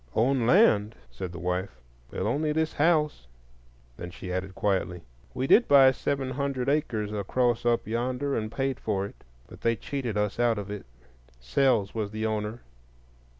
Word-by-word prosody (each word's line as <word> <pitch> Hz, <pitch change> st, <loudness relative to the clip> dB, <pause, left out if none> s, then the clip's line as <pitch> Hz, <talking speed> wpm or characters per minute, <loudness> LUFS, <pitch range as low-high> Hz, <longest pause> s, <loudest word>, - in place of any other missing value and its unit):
"Own 120 Hz, +1 st, +2 dB
land?" 110 Hz, -, +4 dB, 0.2 s
said 85 Hz, +9 st, -6 dB
the 90 Hz, -, -8 dB
wife; 90 Hz, -3 st, -3 dB, 0.3 s
"well, -, -, -3 dB
only 150 Hz, +1 st, 0 dB
this 160 Hz, +1 st, 0 dB
house." 150 Hz, -, +1 dB, 0.7 s
Then 90 Hz, -, -6 dB
she 90 Hz, +1 st, -7 dB
added 95 Hz, +1 st, -4 dB
quietly. 90 Hz, -4 st, -1 dB, 0.3 s
"We 130 Hz, +1 st, -1 dB
did 235 Hz, -, +5 dB
buy 135 Hz, -2 st, +7 dB
seven 135 Hz, 0 st, -2 dB
hundred 135 Hz, -1 st, -2 dB
acres 110 Hz, -8 st, -1 dB
across 120 Hz, +4 st, 0 dB
up 120 Hz, -1 st, +2 dB
yonder, 125 Hz, +5 st, -1 dB
and 110 Hz, 0 st, -3 dB
paid 135 Hz, 0 st, -2 dB
for 100 Hz, -3 st, -1 dB
it; 100 Hz, -, -12 dB, 0.2 s
but -, -, -14 dB
they 115 Hz, 0 st, +2 dB
cheated 125 Hz, -4 st, -4 dB
us 105 Hz, +2 st, -1 dB
out 120 Hz, -2 st, +3 dB
of 100 Hz, -1 st, -5 dB
it. 105 Hz, -10 st, -7 dB, 0.5 s
Sells 105 Hz, -, +1 dB
was 110 Hz, -3 st, -2 dB
the 110 Hz, +1 st, -4 dB
owner." 110 Hz, +1 st, -2 dB
115 Hz, 165 wpm, -27 LUFS, 100-135 Hz, 0.7 s, buy